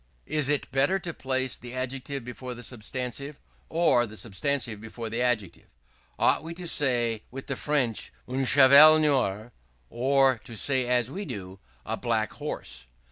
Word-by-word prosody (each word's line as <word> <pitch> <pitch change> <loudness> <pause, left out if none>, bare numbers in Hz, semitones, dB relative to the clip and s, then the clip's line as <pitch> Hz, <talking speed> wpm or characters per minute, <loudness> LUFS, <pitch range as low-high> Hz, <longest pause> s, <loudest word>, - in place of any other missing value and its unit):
Is 150 -2 0
it 145 -2 0
better 135 +8 +2
to 175 -3 -5
place 130 -2 -2
the 125 +1 -9
adjective 130 0 -4
before 125 0 -7
the 120 - -9
substantive, 125 +4 -5 0.3
or 160 -8 +3
the 110 0 -11
substantive 115 0 -2
before 110 0 -7
the 115 +2 -2
adjective? 110 -8 -1 0.5
Ought - - +3
we 165 +2 -7
to 180 0 -7
say 120 -8 +1
with 135 +1 -8
the 135 - -3
French 130 -6 -1 0.2
un 130 +2 -1
cheval 140 +4 +8
noir; 125 -8 +1 0.4
or 135 0 +3
to 115 - -8
say 130 -1 0
as 125 0 +1
we 195 +7 -5
do 95 - -7 0.3
a - - -3
black - - -1
horse? 65 - -6
130 Hz, 160 wpm, -27 LUFS, 120-140 Hz, 0.5 s, cheval